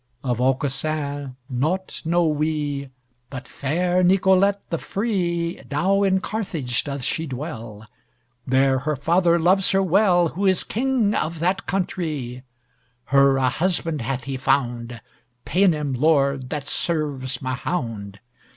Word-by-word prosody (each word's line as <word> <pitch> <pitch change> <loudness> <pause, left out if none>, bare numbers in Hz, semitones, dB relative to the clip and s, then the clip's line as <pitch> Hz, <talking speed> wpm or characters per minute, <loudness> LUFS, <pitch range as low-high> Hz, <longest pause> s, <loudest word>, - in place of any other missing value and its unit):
Of 125 -2 -1
Aucassin 140 +1 -1
naught 155 +9 -2
know 170 +1 +2
we, 150 -2 -1 0.4
But 130 -3 -8
fair 175 +6 0
Nicolette 190 +2 +3
the 165 - -1
free 175 -6 -2
Now 190 +8 +2
in 190 -1 +2
Carthage 165 - -2
doth 140 -2 -4
she 160 +6 -2
dwell; 115 -6 -7 0.6
There 130 0 +3
her 150 +3 -1
father 170 +5 +3
loves 185 +3 +3
her 195 0 +3
well, 180 -2 +3
Who 195 +5 -1
is 185 -2 +2
king 240 -3 0
of 165 -3 -1
that 180 +4 -1
countrie. 155 -10 -3 0.7
Her 140 -1 +5
a 130 -1 +2
husband 165 0 -1
hath 125 +2 -3
he 135 +1 -4
found, 120 -3 -1 0.4
Paynim 160 -7 +2
lord 140 -1 +2
that 150 -3 -4
serves 140 -5 -2
Mahound! 115 - -4
155 Hz, 125 wpm, -23 LUFS, 130-180 Hz, 0.7 s, Her